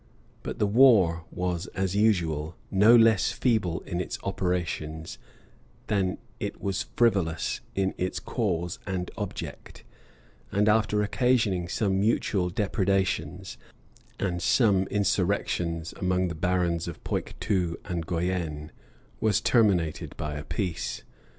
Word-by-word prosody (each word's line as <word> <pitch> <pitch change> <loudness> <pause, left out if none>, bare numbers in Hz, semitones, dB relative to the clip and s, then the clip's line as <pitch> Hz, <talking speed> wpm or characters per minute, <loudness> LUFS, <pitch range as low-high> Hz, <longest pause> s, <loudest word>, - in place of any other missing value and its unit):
Bur - - -4
the - - 0
war 100 -8 +5
was, 90 0 -2
as 95 0 -1
usual, 85 -7 +1 0.2
no 105 +5 +6
less 115 -3 +5
feeble 105 -9 0
in 85 +1 -3
its - - -4
operations 85 -4 -3 0.7
than 95 -3 0 0.2
it - - -4
wail 100 - -2 0.2
frivolous 95 -9 +1
in 95 -1 0
its 90 0 -1
cause 90 -8 -2
and 90 -2 -3
object; - - -7 0.7
and 105 +2 +2
after 105 -1 +3
occasioning 105 -6 +1
some 95 +1 0
mutual 100 -3 +1
depredations,[*] 95 -2 -1 0.6
and 90 -3 -1
some 100 -6 +3
insurrections 90 -5 0
among 90 0 +1
the - - -3
barons 85 0 0
of 85 - -8
Poictou 90 -5 -1
and 85 -3 -3
Guienne, 85 -4 -2 0.5
was 105 -4 +2
terminated 95 -9 +1
by 75 -1 -3
a 75 0 -5
peace. 90 -1 -3
95 Hz, 120 wpm, -27 LUFS, 85-105 Hz, 0.7 s, no